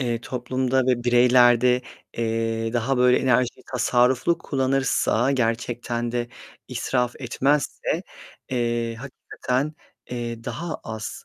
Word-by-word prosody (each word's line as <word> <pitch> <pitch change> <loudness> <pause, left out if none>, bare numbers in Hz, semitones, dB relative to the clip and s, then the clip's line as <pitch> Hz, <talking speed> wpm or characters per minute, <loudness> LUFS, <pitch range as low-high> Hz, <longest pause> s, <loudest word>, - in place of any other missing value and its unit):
eee, 120 -3 -1
toplumda 130 +1 -1
ve 120 -2 +1
bireylerde, 125 0 +5 0.3
eee, 115 0 -1
daha 125 +3 0
böyle 125 0 +4
enerjiyi 125 -1 +1
tasarruflu 125 +6 +2
kullanırsa, 135 -3 +1
gerçekten 120 -1 -1
de 120 -1 -2 0.4
israf 125 -2 -1
etmezse, 140 +3 0 0.5
eee, 120 -2 -1
hakikaten, 135 +3 -3 0.4
eee, 120 -2 -5
daha 170 0 -4
az, 110 -3 -6
125 Hz, 100 wpm, -24 LUFS, 120-130 Hz, 0.5 s, bireylerde